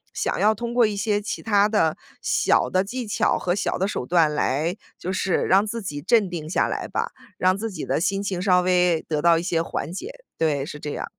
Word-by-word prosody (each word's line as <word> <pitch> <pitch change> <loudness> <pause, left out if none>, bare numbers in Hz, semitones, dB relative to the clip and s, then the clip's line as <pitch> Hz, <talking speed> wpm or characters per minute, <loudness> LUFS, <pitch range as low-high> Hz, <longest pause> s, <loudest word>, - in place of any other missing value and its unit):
想 - - -1
要 215 +1 +4
通 235 +2 -4
过 240 -3 +4
一 210 - -3
些 205 +1 0
其 205 - -5
它 205 -1 +3
的 165 -8 +2 0.3
小 - - +2
的 185 +1 +2
技 240 +4 -5
巧 - - +1
和 175 - -1
小 195 - -1
的 190 - 0
手 165 - -3
段 165 -3 +3
来 155 +5 0 0.2
就 185 +2 -4
是 185 -1 0
让 195 +2 +4
自 230 0 -4
己 145 -6 -5
镇 215 +1 +3
定 160 -3 -6
下 - - +1
来 - - -3
吧， - - -2 0.3
让 185 +1 +3
自 225 +3 -4
己 - - -5
的 - - 0
心 195 +3 0
情 185 -3 -2
稍 180 -2 +4
微 180 -2 +2
得 150 -2 -1
到 170 -1 +5
一 170 - -2
些 170 -3 0
缓 165 -1 -4
解， 390 - -6 0.3
对， 145 -4 +1
是 150 -2 -8
这 150 - -5
样。 - - -4
185 Hz, 250 characters per minute, -23 LUFS, 165-205 Hz, 0.3 s, 到